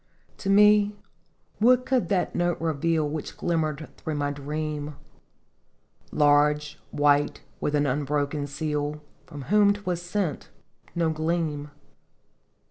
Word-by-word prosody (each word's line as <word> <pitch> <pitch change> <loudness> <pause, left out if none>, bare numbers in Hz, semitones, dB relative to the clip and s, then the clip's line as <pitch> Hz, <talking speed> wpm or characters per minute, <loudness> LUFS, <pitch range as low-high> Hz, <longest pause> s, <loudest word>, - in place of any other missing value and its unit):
" - - -35
To 195 - -3
me 210 +1 +5 0.6
what 250 +3 +4
could 260 -2 +1
that 190 -3 0
note 175 -1 0
reveal 160 0 0
Which 150 0 -5
glimmered 155 -3 -1
through 155 - -4
my 145 0 -1
dream? 150 +1 -4 1.2
Large, 150 0 +3
white, 145 0 +2 0.2
with 150 - -1
an 145 0 +2
unbroken 145 +1 -1
seal, 150 +1 -3 0.2
From 145 -2 -8
whom 205 +5 +4
't 205 0 -11
was 175 -1 -1
sent 180 -2 -3 0.5
no 165 -2 +1
gleam. 155 -2 -2
155 Hz, 125 wpm, -26 LUFS, 145-175 Hz, 1.2 s, me